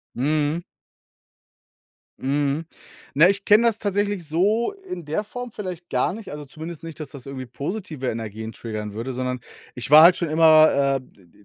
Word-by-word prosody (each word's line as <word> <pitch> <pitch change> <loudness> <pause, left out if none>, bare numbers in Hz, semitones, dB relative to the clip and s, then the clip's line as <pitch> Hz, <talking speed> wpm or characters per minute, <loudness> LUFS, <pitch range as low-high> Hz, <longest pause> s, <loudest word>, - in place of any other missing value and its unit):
Mhm. 150 +4 0 1.6
Mhm, 145 +3 0 0.5
na, 165 +6 +7
ich 200 0 0
kenne 215 +3 +5
das 220 -2 -2
tatsächlich 205 -3 -1
so 205 - +1
in 385 - -8
der 155 +8 -2
Form 245 +2 -8
vielleicht 180 -4 -7
gar - - 0
nicht, 215 +1 -8
also 150 0 -7
zumindest 160 +3 -9
nicht, 165 -2 -9
dass 150 -3 -7
das 140 -2 -10
irgendwie 130 -2 -6
positive 150 - -5
Energien 110 -1 -5
triggern 110 -2 -6
würde, 115 +5 -5
sondern 125 0 -3 0.4
ich 125 -1 -5
war 155 +1 +11
halt 175 +2 +8
schon 170 - -2
immer, 155 -3 +5
äh, - - -12
d 115 -7 -22
d 95 +4 -24
155 Hz, 175 wpm, -23 LUFS, 130-185 Hz, 1.6 s, war